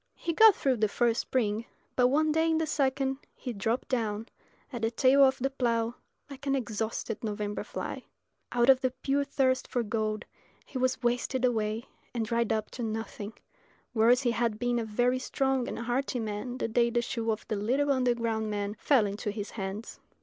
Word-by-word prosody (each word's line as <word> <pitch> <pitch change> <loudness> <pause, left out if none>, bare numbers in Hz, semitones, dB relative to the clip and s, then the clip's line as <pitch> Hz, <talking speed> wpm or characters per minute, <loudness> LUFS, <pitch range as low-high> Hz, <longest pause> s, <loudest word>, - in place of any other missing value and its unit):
He 335 - -2
got 440 +2 +8
through 265 -3 +1
the 215 0 +2
first 235 +2 +1
spring; 225 -3 -1 0.3
but 250 -1 +5
one 305 +4 +2
day 320 +1 +2
in 320 - +2
the 320 - +1
second 270 -2 0 0.2
he 250 - -5
dropped 225 +4 -1
down 225 -4 -1 0.5
at 240 - -4
the 225 - +2
tail 260 +4 +5
of 265 -1 +4
the 270 +2 -1
plough 235 -3 0 0.3
like 275 0 -9
an 275 - +3
exhausted 225 -2 -3
November 210 -1 -3
fly. - - -5 0.5
Out 240 0 +3
of 265 -1 +6
the 255 - +2
pure 275 +2 0
thirst 265 -2 +1
for 245 - -1
gold 215 0 -2 0.4
he 260 - -5
was 255 0 0
wasted 245 +1 +1
away 220 -1 0 0.3
and 230 -2 0
dried 230 +1 0
up 220 -1 -1
to 250 - -7
nothing, 220 -1 -4 0.6
whereas 240 +3 +4
he 240 - +2
had 230 -2 0
been 245 +1 0
a 230 - -2
very 245 +4 +1
strong 265 -1 0
and - - -4
hearty 245 +2 -1
man 220 +3 -4
the - - -1
day 235 +1 +2
the 240 0 0
shoe 230 -2 -2
of 215 -1 -2
the 215 - -1
little 260 +8 +1
underground 235 -4 +1
man 205 0 -2
fell 260 -7 +4
into 205 +1 -3
his 205 0 -5
hands. 200 +1 -5
240 Hz, 195 wpm, -29 LUFS, 220-260 Hz, 0.6 s, got